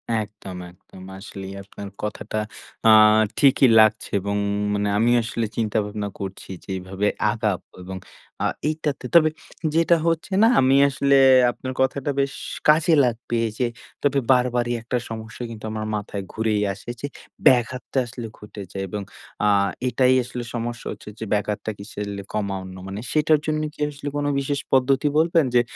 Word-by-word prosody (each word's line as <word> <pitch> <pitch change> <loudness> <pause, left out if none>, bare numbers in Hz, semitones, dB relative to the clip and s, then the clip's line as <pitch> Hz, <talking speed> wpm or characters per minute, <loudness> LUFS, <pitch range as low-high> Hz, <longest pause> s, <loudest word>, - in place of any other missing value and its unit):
একদম, 105 -4 -5
একদম। 95 +1 -16
আসলেই 95 -1 -8
আপনার 100 0 -9 0.2
কথাটা 105 +1 -4 0.5
আ - - +8 0.5
ঠিকই 135 -1 +5
লাগছে 110 0 +4
এবং 100 +1 -2 0.4
মানে 100 0 0
আমি 115 +2 +3
আসলে 115 0 -2
চিন্তা-ভাবনা 105 -2 -1
করছি 95 -1 -7
যে, - - -20
এভাবে 95 +3 -2 0.2
আগাব 105 -5 -1 0.2
এবং 95 +1 -7 0.5
আ - - +2 0.2
এইটাতে, 150 -4 -3
তবে 155 -2 +7 0.5
যেটা 165 +1 +4
হচ্ছে 165 +4 -1
না - - +7
আমি 130 +1 +4
আসলে 140 0 +2 0.4
আপনার 130 +1 -6
কথাটা 130 +1 0
বেশ 140 0 0 0.3
কাজে 155 +2 +5
লাগবে। 120 0 -2 0.2
যে, - - 0 0.4
তবে 140 -1 +3
বারবারই 125 -1 +2
একটা 125 +2 -2
সমস্যা 110 +1 -7
কিন্তু 110 -1 -8
আমার 110 0 -3
মাথায় 100 -1 -4
ঘুরেই 110 -2 0
আসে, 100 - -12
যে, 145 - -2 0.4
ব্যাঘাতটা 130 +1 +2
আসলে 120 -1 -7
ঘটে 105 -1 -10
যায়, 95 - -4
এবং 105 +2 -4 0.4
আ - - +4 0.4
এটাই 130 0 +3
আসলে 120 0 -6
সমস্যা 120 0 -4
হচ্ছে - - -9
যে 110 - -4
ব্যাঘাতটা 105 +1 -1
কিসের 100 0 -6
লে 100 - -5
কমা 100 -2 -1
অন্য, 95 0 -9
মানে 100 +2 -5
সেটার 155 0 +3
জন্য 155 0 0
কি - - -23
আসলে 145 0 -8
কোনো 145 0 0
বিশেষ 140 +1 -1
পদ্ধতি 135 +2 +3
বলবেন, 165 -1 +3
যে, 120 - +7
115 Hz, 160 wpm, -23 LUFS, 105-135 Hz, 0.5 s, আ